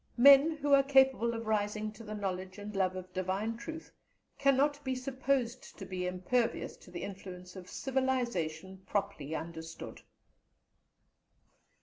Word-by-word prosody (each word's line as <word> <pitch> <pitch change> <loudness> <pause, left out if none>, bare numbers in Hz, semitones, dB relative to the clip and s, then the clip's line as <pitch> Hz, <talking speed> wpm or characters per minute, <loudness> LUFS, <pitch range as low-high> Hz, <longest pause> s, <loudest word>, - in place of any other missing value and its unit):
Men 280 +5 +8
who 290 -1 +1
are 275 - +8
capable 265 -4 +4
of 230 0 -5
rising 215 0 0
to 220 +2 -12
the 215 -1 -6
knowledge 190 -2 -4
and 205 0 -7
love 185 -1 +1
of 185 0 -8
divine 190 +5 -1
truth 320 +7 -8 0.5
cannot 280 +1 +3
be 260 -1 -1
supposed 255 -1 -2
to 195 - -7
be 180 -1 -3
impervious 185 +7 0
to - - -16
the 175 -1 -6
influence 180 -2 -8
of 185 -1 -9
civilization 235 - -1
properly 170 -7 -2
understood. 165 0 -7
215 Hz, 135 wpm, -32 LUFS, 185-265 Hz, 0.5 s, Men